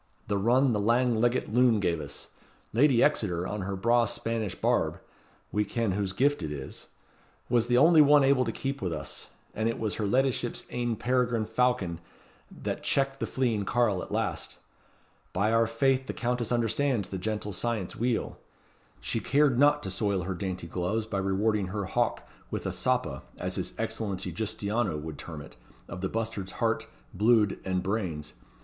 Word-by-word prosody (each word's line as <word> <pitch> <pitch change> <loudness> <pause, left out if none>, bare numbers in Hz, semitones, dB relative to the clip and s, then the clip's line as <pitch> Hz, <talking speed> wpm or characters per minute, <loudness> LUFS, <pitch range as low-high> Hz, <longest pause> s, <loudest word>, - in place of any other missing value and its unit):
the 105 - 0
run 125 +5 +3
the 105 - +1
lang 115 +2 +2
leggit 120 -2 +1
loon 120 -2 +4
gave 85 -5 0
us. 70 -1 -7 0.4
Lady 125 0 +5
Exeter, 90 - +1
on 105 +1 -3
her 95 +1 -3
braw 120 +5 +3
Spanish 115 -3 -2
barb - - +1 0.5
we 105 - +1
ken 115 0 -1
whose 100 0 -1
gift 140 +8 +2
it 75 - -3
is 70 -3 -7 0.6
was 120 -1 +3
the 120 - +3
only 160 +4 +7
one 145 -1 +6
able 135 -1 +4
to - - -2
keep 135 0 -4
with 90 -3 -1
us; - - -5 0.3
and 110 +1 0
it 115 - -2
was 110 -2 -2
her 105 - 0
leddyship's 125 +1 0
ain 120 -1 -1
peregrine 125 -2 +1
falcon 110 -7 0 0.5
that - - -5
checked 135 0 +1
the - - -2
fleeing 120 -6 0
carle 105 -4 +1
at - - -8
last. - - -2 0.8
By 100 +4 +1
our 115 0 +4
faith 130 +3 +1
the - - -3
Countess 120 -1 -1
understands 120 -1 +1
the 95 - -4
gentle 105 +1 -3
science 110 -2 -2
weel. 120 0 -1 0.6
She 115 - -1
cared 135 +2 +3
not 145 +1 +4
to 95 - -3
soil 100 -1 0
her 95 +2 -2
dainty 90 -1 -4
gloves 90 +6 -2
by 100 -3 -2
rewarding 100 +1 +1
her 100 +1 -3
hawk 120 +5 -1 0.2
with - - -4
a - - -1
soppa, 65 0 0 0.2
as - - -3
his - - -4
Excellency 95 -4 -3
Giustiniano 105 0 -1
would 75 -1 -7
term 80 -3 -7
it, - - -15 0.3
of 90 - -7
the 95 - -1
bustard's 110 -4 -3
heart, - - 0 0.3
bluid, 110 0 +3
and 95 -1 -1
brains. 90 -8 -3
110 Hz, 175 wpm, -28 LUFS, 95-120 Hz, 0.8 s, only